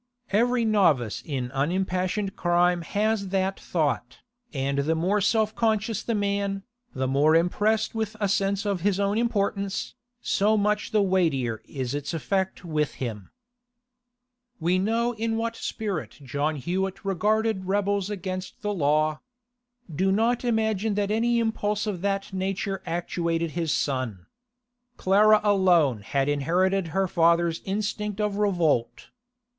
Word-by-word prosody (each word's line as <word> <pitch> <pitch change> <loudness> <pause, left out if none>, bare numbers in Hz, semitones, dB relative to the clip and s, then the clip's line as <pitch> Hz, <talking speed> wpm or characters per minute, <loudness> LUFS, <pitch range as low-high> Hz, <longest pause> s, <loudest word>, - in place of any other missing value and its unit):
Every 235 +3 +2
novice 155 - +2
in 130 -4 -4
unimpassioned 185 +7 -1
crime 175 0 +2
has 205 +3 0
that 190 0 -1
thought, 155 -5 -1 0.3
and 140 -1 -1
the 155 +4 +1
more 190 +6 +1
self 215 +1 +2
conscious 220 -1 0
the 230 - -2
man, 200 -1 -1 0.3
the 130 0 -1
more 145 +4 +3
impressed 210 +6 +2
with 220 -1 -3
a 205 - +1
sense 200 +1 0
of 200 -4 -1
his 200 +1 +1
own 200 +2 +1
importance, 200 -4 -1 0.3
so 215 -1 +2
much 210 0 0
the 215 -2 +2
weightier 155 - +1
is 130 -2 -4
its 145 +3 -3
effect 190 +3 -2
with 150 -3 -1
him. 110 -6 -5 1.3
We 175 +3 +2
know 230 +4 +1
in 225 0 -2
what 230 0 -2
spirit 205 -8 -4
John 145 +3 -1
Hewett 185 +7 -3
regarded 210 +1 +1
rebels 200 0 0
against 185 -1 -5
the 210 0 -1
law. 155 -2 +1 0.7
Do 190 +4 +2
not 230 +5 +1
imagine 220 -3 0
that 205 0 0
any 235 +2 +2
impulse 210 -2 0
of 200 -5 -3
that 195 0 -2
nature 195 +1 -2
actuated 170 -1 -1
his 165 -1 -1
son. 130 -10 -2 0.7
Clara 210 +3 +5
alone 180 - +3
had 135 +7 -1
inherited 175 +6 +1
her 190 +4 0
father's 170 -1 +2
instinct 210 +1 -2
of 210 -1 0
revolt. 175 - 0
190 Hz, 135 wpm, -26 LUFS, 165-210 Hz, 1.3 s, Clara